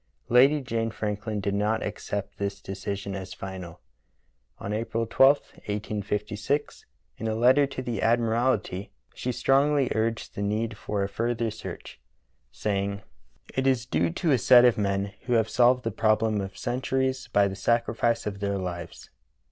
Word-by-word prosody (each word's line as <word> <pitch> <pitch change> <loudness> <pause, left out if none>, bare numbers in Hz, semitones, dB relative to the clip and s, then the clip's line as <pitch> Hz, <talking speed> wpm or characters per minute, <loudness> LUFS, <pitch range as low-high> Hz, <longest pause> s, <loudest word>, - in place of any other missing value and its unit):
Lady 135 +5 +5
Jane 115 -3 -2
Franklin 105 0 -3
did 100 0 -1
not 105 +2 0
accept 100 0 -5
this 100 0 -2
decision 100 0 -5
as 95 -1 -6
final. 90 -3 -8 0.8
On 100 - -4
April 115 +1 -1
12, 135 +5 +5 0.3
1856, 105 +5 -2 0.3
in 110 - -3
a 110 - -1
letter 130 +5 +5
to 130 -1 -6
the 120 -5 -3
admiralty, 115 -4 +1 0.2
she 125 - -3
strongly 135 +2 +2
urged 115 +1 -1
the - - -5
need 110 +2 -1
for 105 -1 -2
a - - 0
further 115 +2 -1
search, 110 - -9 0.5
saying: 100 0 -2 0.5
"It 130 0 0
is 130 -3 +2
due 85 -9 +1
to 155 - 0
a 130 - +4
set 125 +1 +7
of 120 - +5
men 100 -1 -1
who 125 - +1
have 110 -2 +3
solved 125 +1 +4
the 115 - -1
problem 110 0 +2
of 95 -1 -7
centuries 130 +1 -1
by 100 -1 +4
the 95 - -5
sacrifice 115 +2 +1
of 100 -1 -4
their 100 -1 -1
lives." 85 -2 -6
110 Hz, 155 wpm, -27 LUFS, 100-120 Hz, 0.8 s, set